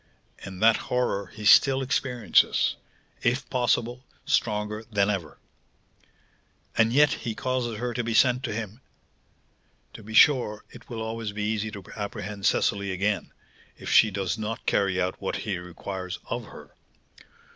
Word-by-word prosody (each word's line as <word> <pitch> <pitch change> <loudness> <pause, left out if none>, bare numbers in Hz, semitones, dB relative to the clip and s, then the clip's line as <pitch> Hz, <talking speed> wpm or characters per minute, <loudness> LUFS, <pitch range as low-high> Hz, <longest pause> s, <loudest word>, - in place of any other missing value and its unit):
"And 95 0 -6
that 115 0 +6
horror 120 -6 0
he 105 +2 -10
still 135 +4 +6
experiences; 125 -5 +2 0.5
if 125 +3 0
possible, 125 0 0 0.2
stronger 105 0 0
than 100 -1 +2
ever." 90 -7 -5 1.4
"And 115 0 +3
yet 145 +2 +5
he 115 -4 -4
causes 120 -1 -2
her 120 +2 -3
to 120 - -2
be 115 -1 -2
sent 125 +1 +4
to - - -3
him! 110 +2 -5 1.1
To - - -10
be 110 +1 -8
sure, 120 -6 +4
it 120 - -14
will 115 -2 -4
always 110 -1 -4
be 105 0 -3
easy 110 0 -1
to 100 -2 -9
apprehend 100 -1 -4
Cecily 100 -2 +1
again, 100 +3 -1 0.5
if - - -6
she 110 - +6
does 100 +2 -3
not 110 +1 -4
carry 95 -2 +1
out 90 0 -2
what 95 - -2
he 100 -5 -3
requires 90 +1 -6
of - - -3
her. - - -13
110 Hz, 150 wpm, -26 LUFS, 100-120 Hz, 1.4 s, that